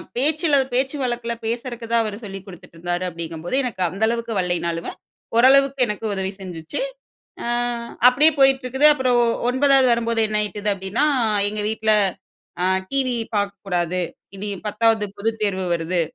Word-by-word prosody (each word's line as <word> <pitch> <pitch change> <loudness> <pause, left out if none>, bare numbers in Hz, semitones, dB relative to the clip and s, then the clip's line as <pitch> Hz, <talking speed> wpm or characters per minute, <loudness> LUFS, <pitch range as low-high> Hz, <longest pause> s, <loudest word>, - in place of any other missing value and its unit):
பேச்சுல 300 +4 +2 0.2
பேச்சு 265 +3 0
வழக்குல 240 -1 -2
பேசுறக்கு 235 +1 -4
தான் 235 0 +4
அவர் 215 -2 -4
சொல்லிக் 195 -2 -7
குடுத்துட்ருந்தாரு. 175 -1 -5
அப்டீங்கும்போது, 165 +3 -5
எனக்கு 235 -7 -4
அந்த 190 +5 -4
அளவுக்கு 235 0 -2
வரலேன்னாலும், 170 -2 -2 0.5
ஓரளவுக்கு 275 +3 +5
எனக்கு 210 +1 -4
உதவி 190 -1 -2
செஞ்சிச்சு. 165 -4 -6 0.7
அ, - - -3 0.6
அப்டீயே 285 +6 +5
போயிட்ருக்குது. 270 +1 +4
அப்பறம் 255 -4 +2 0.3
9ஆவது 270 +1 +4
வரும்போது 230 -1 0
என்னாயிட்டது 210 -1 -1
அப்டீன்னா, 195 +8 -1 0.4
எங்க 210 +1 -3
வீட்ல 220 0 +1 0.7
அ, - - +2 0.3
"டிவி 260 -3 +1 0.2
பாக்கக்கூடாது. 190 -3 -2 0.4
இனி 205 +2 -4 0.2
10ஆவது 220 0 +2
பொதுத் 220 +2 -2
தேர்வு 190 -2 0
வருது. 170 +1 -1
220 Hz, 130 wpm, -21 LUFS, 190-250 Hz, 0.7 s, ஓரளவுக்கு